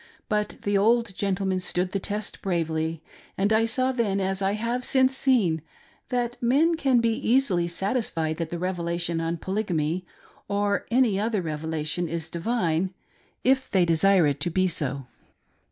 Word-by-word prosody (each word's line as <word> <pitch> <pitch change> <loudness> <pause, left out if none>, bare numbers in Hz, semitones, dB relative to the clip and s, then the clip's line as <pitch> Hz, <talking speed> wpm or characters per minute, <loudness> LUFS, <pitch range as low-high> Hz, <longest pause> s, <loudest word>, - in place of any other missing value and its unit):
But 210 -1 -1
the 205 -1 +2
old 230 0 +2
gentleman 195 -1 0
stood 180 0 -1
fhe 195 - -2
test 210 +1 -4
bravely, 160 -3 -1 0.3
and 200 +3 +2
I 220 +1 +4
saw 255 +3 +1
then, 220 -6 0
as 190 0 -1
I 195 +1 +1
have 235 +4 -2
seen 260 0 +4
since, 240 - +1 0.5
that 245 0 -2
men 285 +8 +3
can 265 -6 +2
be 230 0 +2
easily 225 -7 +2
satisfied 170 -4 -1
that 165 -2 -3
the 175 - -4
Revelation 170 -1 -2
on 165 +1 -2
Polygamy, 180 -3 -2 0.4
or 200 0 0
any 235 -5 +3
other 215 -3 0
revelation, 160 +1 -2
is 160 0 -5
divine, 180 -2 -1 0.5
if 265 +1 +2
they 185 -3 +3
desire 175 +2 +4
it 145 -2 0
to 175 - 0
be 185 +2 +2
so. 140 -5 -1
195 Hz, 155 wpm, -26 LUFS, 170-230 Hz, 0.5 s, I